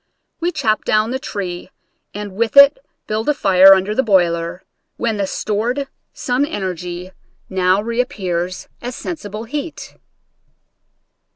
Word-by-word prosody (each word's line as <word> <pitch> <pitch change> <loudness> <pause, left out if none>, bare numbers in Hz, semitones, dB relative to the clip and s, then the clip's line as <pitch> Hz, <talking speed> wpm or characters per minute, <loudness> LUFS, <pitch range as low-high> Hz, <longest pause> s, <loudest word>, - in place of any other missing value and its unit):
We 345 +1 0
chop 220 -10 0
down 215 +2 +1
the 260 - -2
tree 185 -7 -5 0.4
and 205 -2 -7
with 230 +5 -1
it 280 - +8 0.3
build 215 +5 -2
a 295 - +2
fire 195 -5 +7
under 190 +2 -1
the 260 - +2
boiler, 175 -5 +1 0.3
when 225 -2 -1
the 200 -1 -1
stored 235 +9 -2 0.2
sun 250 +2 -1
energy 180 - -4 0.4
now 190 +1 +2
reappears 195 -7 -2
as 245 +1 -5
sensi 315 -12 -6
ble 210 +2 -6
heat. 295 +7 -6
210 Hz, 130 wpm, -19 LUFS, 185-250 Hz, 0.4 s, it